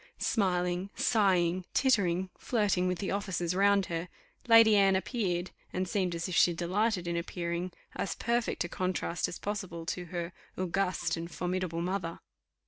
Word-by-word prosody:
Smiling, 180 -2 0
sighing, 185 -5 +2
tittering, 190 -8 +2
flirting 205 -6 +1
with 180 -1 0
the 190 +2 -3
officers 185 -4 -1
round 200 +1 +4
her, 170 +1 -4 0.4
Lady 225 -2 +8
Anne 195 -1 +5
appeared, 190 -4 -1 0.2
and 185 0 -2
seemed 180 -2 0
as 165 +2 -3
if 185 - -5
she 175 +1 +5
delighted 185 +2 0
in 170 - -1
appearing, 170 +1 -3 0.2
as - - -2
perfect 235 0 0
a - - -3
contrast 175 -2 -1
as - - -6
possible 190 -5 -4
to 180 +1 -3
her 175 0 -4 0.2
august 185 -2 0
and 165 +1 -5
formidable 180 -1 -2
mother. 180 -2 -3
180 Hz, 150 wpm, -30 LUFS, 175-200 Hz, 0.4 s, Lady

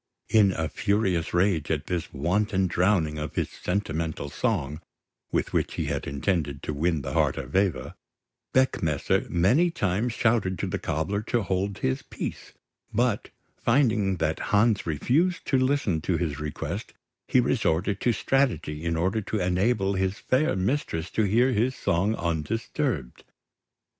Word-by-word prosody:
In 105 -3 +5
a 80 -2 -1
furious 95 -4 0
rage 85 -4 +1
at 75 -1 -1
this 85 -2 -3
wanton 95 +6 +1
drowning 85 -3 +1
of 75 0 -5
his - - -1
sentimental 80 -6 -3
song, 80 - -1 0.5
with - - -1
which - - 0
he - - -1
had - - -3
intended 70 -1 -1
to 75 - -3
win 80 0 0
the - - -4
heart - - +2
of - - -6
Eva, 95 -10 +1 0.6
Beckmesser 85 - +1
many 105 - +3
times 110 - -1
shouted 110 -6 +1
to - - -2
the - - -2
cobbler 80 +7 -1
to 115 +1 0
hold 95 +1 -1
his 65 0 -1
peace; - - -6 0.4
but, 120 -1 0 0.3
finding 115 -6 +2
that 80 0 -1
Hans 105 -1 +3
refused 150 - +1
to 135 - +3
listen 130 - +1
to 85 +1 0
his 75 -5 -2
request 75 -1 -5 0.3
he 130 - +4
resorted 100 -6 +1
to 120 - +3
strategy 115 - 0
in 85 -1 0
order 95 +6 +1
to 105 +1 -3
enable 95 +3 +1
his 95 +1 0
fair 130 +5 +1
mistress 95 - -1
to 110 - +1
hear 120 +6 +3
his 125 +3 +1
song 95 +6 +1
undisturbed. 85 - -2
95 Hz, 150 wpm, -26 LUFS, 80-110 Hz, 0.6 s, In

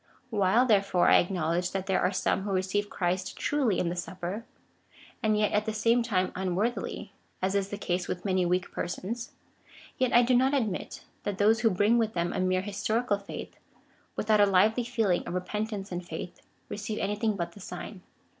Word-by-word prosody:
While, 210 +3 +3
therefore, 200 -6 +3
I - - +7
acknowledge 175 -1 -1
that 190 -1 -2
there 190 - +1
are 180 - +2
some 190 - 0
who 200 +1 -3
receive 195 +2 0
Christ 185 +1 -2
truly 265 -10 +1
in 170 - 0
the 175 - -3
Supper, 185 +4 -5 0.8
and 215 -2 +2
yet 210 0 +2
at 210 +1 +1
the 220 - -1
same 230 +3 +3
time 185 -6 0
unwor 190 +5 0
thily, - - -6 0.3
as 190 +1 0
is 200 -1 0
the 205 - -4
case 180 -2 -2
with 180 +1 -4
many 185 -2 +2
weak 180 +1 0
persons, 225 +7 -4 0.7
yet 255 -1 +2
I 240 - +6
do 250 +1 +3
not 260 +3 +3
admit, 220 -9 -2 0.2
that 205 -2 -3
those 215 +3 +4
who 225 0 +4
bring 210 +5 +3
with 220 -1 0
them 170 0 0
a - - -2
mere 185 0 +2
historical 205 +2 -1
faith,^ 200 - -8 0.6
without 215 -1 +3
a 205 - +6
lively 215 +5 +3
feeling 225 -7 +1
of 175 - -3
repentance 205 +1 -3
and 175 0 -3
faith, 170 +1 -7 0.3
re - - -5
ceive 215 +1 -4
anything 210 +2 0
but 170 -2 -3
the 205 - -14
sign. 185 +1 -8
200 Hz, 195 wpm, -28 LUFS, 185-220 Hz, 0.8 s, I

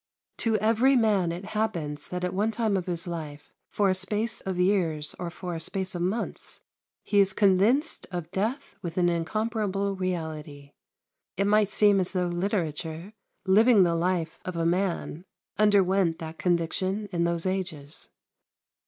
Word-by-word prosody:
To 225 -1 +1
every 230 +6 +3
man 205 -8 +3
it 175 +3 -6
happens 170 -10 -2
that 180 0 -4
at 180 - -1
one 205 +4 +1
time 220 -2 0
of 185 -2 -2
his 170 -2 -3
life 155 -4 -7 0.2
for 205 - +1
a 190 - +3
space 210 +4 -1
of 190 -2 -4
years 175 -5 +1
or 175 - -3
for 175 +1 -6
a 165 - -4
space 190 +1 -2
of 175 - -4
months 190 +7 -3 0.4
he 205 - +2
is 195 -1 +4
convinced 210 - +2
of 175 -2 -5
death 225 +10 -3
with 170 -1 -6
an 175 -1 +3
incomparable 200 +3 -1
reality. 160 -6 -4 0.7
It 195 - +1
might 210 0 +3
seem 205 -2 +4
as 185 +1 -1
though 180 -1 +1
literature, 175 -1 -3 0.3
living 210 +2 +6
the 170 -1 +2
life 170 -1 -1
of 185 - -5
a 165 0 0
man, 175 -2 -1 0.4
underwent 195 -5 +3
that 160 0 -8
conviction 185 +4 0
in 170 -2 0
those 170 0 -1
ages. 175 -7 -4
185 Hz, 160 wpm, -27 LUFS, 170-205 Hz, 0.7 s, living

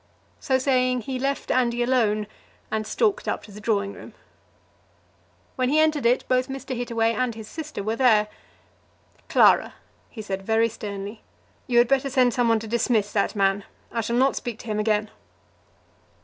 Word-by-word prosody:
So 260 - +1
saying, 255 -1 +1
he 255 +3 -4
left 275 +2 -2
Andy 240 -1 +1
alone 220 -4 +1 0.5
and 215 -1 -2
stalked 425 -4 0
up - - -2
to 210 - -13
the 210 +1 -11
drawing 200 -2 0
room. - - -12 1.4
When 255 -1 +1
he 295 - +2
entered 310 -5 +2
it, 245 +2 +1
both 255 0 +1
Mr. 270 -1 -5
Hittaway 230 -1 0
and 235 0 -1
his 220 -1 -9
sister 305 -8 -6
were 220 +2 -2
there. 220 -5 +4 1.0
"Clara," - - +4 0.3
he 220 - -8
said 195 -2 -4
very 225 +3 +2
sternly, 205 -1 -7 0.5
"you 245 -2 +1
had 240 0 +6
better 275 +1 +1
send 255 -2 +3
some 245 -2 +1
one 225 - +4
to 220 - -7
dismiss 220 -2 +1
that 200 0 0
man. 195 0 +1 0.3
I 230 - -1
shall 235 +2 -2
not 265 +2 +3
speak 240 -3 -4
to - - -15
him 215 -2 -2
again." 215 0 0
235 Hz, 175 wpm, -24 LUFS, 215-255 Hz, 1.4 s, had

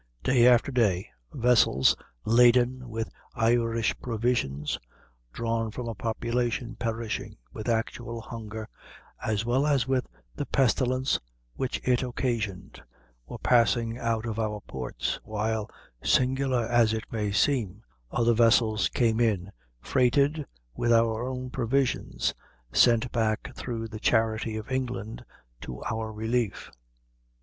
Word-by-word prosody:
Day 125 -2 +5
after 125 +3 +5
day, 100 -8 +1 0.2
vessels 115 - +4 0.3
laden 125 +2 +4
with 110 0 -4 0.2
Irish 115 0 +2
provisions, 110 - -1 0.5
drawn 115 - -1
from 120 +2 -6
a 115 - -3
population 115 +2 -2
perishing 115 -1 -3 0.2
with 110 +2 -4
actual 115 0 -2
hunger, 110 -1 -7 0.6
as 110 0 0
well 130 +5 +2
as 135 -4 +2
with 130 -1 0 0.3
the - - -4
pestilence 130 +1 +2 0.3
which 130 - -2
it 125 -1 +3
occasioned, 120 -6 -3 0.5
were - - -7
passing 115 0 +2
out 115 -1 -1
of 115 -1 -3
our 105 -1 -1
ports, 65 -9 -4
while, 110 0 -2 0.3
singular 130 -1 +2
as 115 -1 +3
it 110 -1 -2
may 105 -3 -1
seem, 110 -2 +1 0.3
other 120 - +2
vessels 110 -3 +4
came 115 -2 +1
in 100 -5 +1 0.3
freighted 140 - +2 0.3
with 120 - 0
our 115 +1 +3
own 130 -1 -5
provisions, 125 - 0 0.4
sent 120 0 +4
back 110 -2 -1
through 115 -2 -4
the 110 -1 -8
charity 110 0 +1
of 110 +4 -7
England 125 -4 -3 0.4
to 60 -1 -7
our 110 0 -3
relief. 110 +1 -2
115 Hz, 120 wpm, -27 LUFS, 110-125 Hz, 0.6 s, Day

